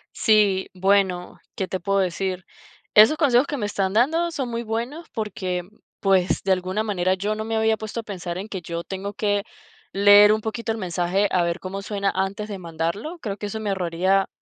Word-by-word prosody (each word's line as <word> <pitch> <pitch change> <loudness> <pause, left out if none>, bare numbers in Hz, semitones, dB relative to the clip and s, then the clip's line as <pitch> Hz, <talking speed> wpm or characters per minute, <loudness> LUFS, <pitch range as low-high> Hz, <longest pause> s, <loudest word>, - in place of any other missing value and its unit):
Sí, 205 -4 +3
bueno, 190 -1 +1 0.2
¿qué 190 - -2
te 185 +1 -3
puedo 195 +3 0
decir? 185 0 -1 0.5
Esos 220 +9 +7
consejos 275 -3 +3
que 290 - -3
me 210 - -2
están 195 -2 -1
dando 320 +10 +2
son 290 -6 -3
muy 235 0 -3
buenos 235 +9 -4
porque, 185 -5 -3 0.4
pues 190 -2 +2
de 195 - +1
alguna 185 +3 0
manera 185 -3 0
yo 205 +3 -2
no 215 0 -4
me 225 0 -2
había 220 0 +2
puesto 220 +2 -5
a - - -22
pensar 180 -4 -5
en 195 +3 -5
que 190 -4 -5
yo 170 0 -5
tengo 195 +2 -5
que 205 -1 +1 0.5
leer 205 +1 +7
un 215 0 +1
poquito 225 +1 -3
el 225 - -3
mensaje 180 +1 0
a 180 - +2
ver 170 0 -1
cómo 190 +1 -5
suena 200 -1 -1
antes 195 +3 -2
de 200 -3 -6
mandarlo. 170 - -4
Creo 205 -6 -4
que 205 - -5
eso 220 +2 -5
me 215 -2 -3
ahorraría 190 +1 +1
200 Hz, 205 wpm, -23 LUFS, 185-220 Hz, 0.5 s, Esos